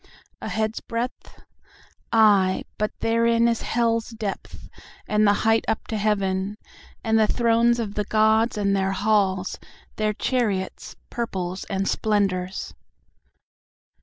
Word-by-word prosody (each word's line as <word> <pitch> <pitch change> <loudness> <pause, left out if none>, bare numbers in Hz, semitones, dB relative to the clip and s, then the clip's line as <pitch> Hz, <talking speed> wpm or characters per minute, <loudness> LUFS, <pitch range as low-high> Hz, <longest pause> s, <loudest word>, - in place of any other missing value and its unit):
A - - -4
head's 220 0 -1
breadth? 235 +2 -6 0.7
Ay, 200 -4 +4 0.2
but 215 0 0
therein 230 +1 +3
is 230 -1 0
hell's 230 -1 0
depth, 220 -4 -6 0.4
and 210 0 +3
the 205 - +5
height 225 0 +4
up 220 - -1
to 220 - -2
heaven, 200 -1 0 0.5
And 225 -1 +2
the 215 - +4
thrones 235 0 +2
of 215 -3 -3
the 210 0 -2
gods 220 +2 +2
and 200 -1 +1
their 195 0 0
halls, 195 -2 +1 0.4
their 215 0 0
chariots, 210 -6 -2 0.2
purples, 185 -6 -4
and 195 0 -2
splendors. 195 -3 -1
215 Hz, 125 wpm, -24 LUFS, 195-230 Hz, 0.7 s, the